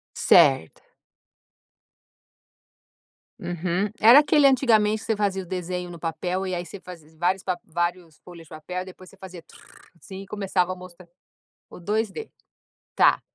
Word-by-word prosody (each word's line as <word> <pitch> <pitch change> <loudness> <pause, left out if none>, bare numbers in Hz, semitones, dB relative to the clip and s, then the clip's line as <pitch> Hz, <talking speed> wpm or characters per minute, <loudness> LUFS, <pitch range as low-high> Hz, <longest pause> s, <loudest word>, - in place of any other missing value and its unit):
Certo. 130 - +3 2.6
Uhum. 175 +3 -2
Era 235 +6 +8
aquele 295 -1 +3
antigamente, 220 -5 +3
que - - -11
você 220 - +1
fazia 195 -2 -1
o - - -13
desenho 180 0 -5
no 170 -1 -10
papel, 175 +4 -3
e 185 - -4
aí 175 0 -4
você 190 +4 -10
fazia 170 -4 -13
vários 185 +3 0 0.2
vários 175 -1 -4
folhas 170 -2 -14
de - - -22
papel 175 +3 -6
e - - -15
depois 185 -1 -13
você 195 - -19
fazia 185 -3 -11
tru, - - -19 0.4
assim, 195 0 -10
e 195 - -12
começava 190 -3 -1
a - - -4
mostra 180 -1 -14 0.6
o - - -12
2D, 215 - -3 0.7
tá. - - +4
185 Hz, 155 wpm, -24 LUFS, 175-200 Hz, 2.6 s, Era